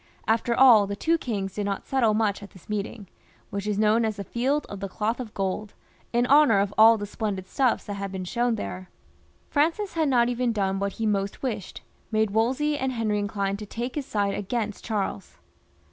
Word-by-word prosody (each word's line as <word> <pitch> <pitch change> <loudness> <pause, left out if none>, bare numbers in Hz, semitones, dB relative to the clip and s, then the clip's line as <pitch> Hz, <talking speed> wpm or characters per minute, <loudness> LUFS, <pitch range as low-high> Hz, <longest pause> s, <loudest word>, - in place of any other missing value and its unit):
After 230 +1 +2
aU, 230 -6 +7
the 200 - -3
two 330 +10 +1
kings 200 -8 -3
did 205 - -3
not 200 -1 -3
settle 235 -5 +2
much 210 -2 0
at 200 - -10
this 185 - -18
meeting, 210 0 -4 0.4
which 200 +1 -4
is 210 -1 0
known 215 +2 +3
as 220 -1 -1
the 200 - -5
Field 265 +8 -1
of 200 - -7
the 195 - -3
Cloth 220 +5 -2
of 240 -4 -6
Gold, 195 +2 -3 0.4
in 240 +1 +2
honour 280 -5 +6
of 200 0 0
aill 225 +1 +7
the 205 - -4
splen 210 0 -3
did 190 0 -8
stuffs 255 +3 +1
that 205 - -5
had 200 -1 -5
been 190 -1 -5
shown 240 +5 0
there. 185 -3 -6 0.6
Francis 330 +7 +1
had 320 -3 +1
not 240 -3 +4
even 245 -1 0
done 195 -2 0
what 200 0 -2
he 225 - -3
most 200 +1 -1
wished, 215 -7 -4 0.3
made 215 -1 +1
Wolsey 265 +7 +1
and 260 0 -1
Henry 215 -3 0
inclined 200 -1 -2
to 210 - -7
take 240 +4 -4
his 290 -3 -4
side 200 -2 0
against 210 +1 -3
Charles. 200 - -3
215 Hz, 210 wpm, -26 LUFS, 200-240 Hz, 0.6 s, aU